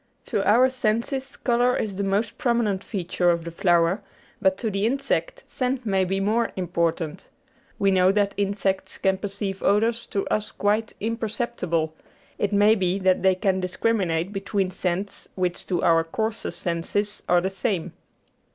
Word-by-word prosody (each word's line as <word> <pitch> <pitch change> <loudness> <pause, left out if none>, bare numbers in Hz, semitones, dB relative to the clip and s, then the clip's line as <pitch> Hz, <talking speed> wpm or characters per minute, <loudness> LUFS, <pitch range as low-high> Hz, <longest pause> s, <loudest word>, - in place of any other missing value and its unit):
To - - -1
our 245 +5 +6
senses 260 +2 -2
colour 245 0 +2
is 205 -3 -2
the 200 - -2
most 200 +3 -1
prominent 235 -8 +1
feature 180 -3 0
of 170 -1 +1
the 170 - -6
flower, 170 +2 +2 0.4
but 190 0 +3
to 220 0 -2
the 195 0 -1
insect 485 - -1
scent 255 -1 -2
may 195 -3 +2
be 195 +2 -1
more 220 +4 +1
im 180 -3 -3
portant. 170 -1 -1 0.5
We 195 -1 +3
know 185 0 +5
that 200 0 +1
insects 200 -1 -1
can 190 0 +1
perceive 195 -1 -4
odours 225 +3 +2
to 200 - -2
us 215 0 -1
quite 210 +2 0
imperceptible; 215 -8 -2 0.5
it 205 - 0
may 205 +1 +5
be 190 -3 +1
that 185 -1 +2
they 190 -1 +4
can 190 0 +1
discriminate 185 -2 0
between 195 -1 -1
scents 185 +2 -3
which 180 -2 -2
to 180 -2 0
our 165 -1 +4
coarser 220 +7 -3
senses 175 +5 -2
are 175 - +5
the 190 +2 -1
same. 195 -3 -2
195 Hz, 160 wpm, -24 LUFS, 185-220 Hz, 0.5 s, our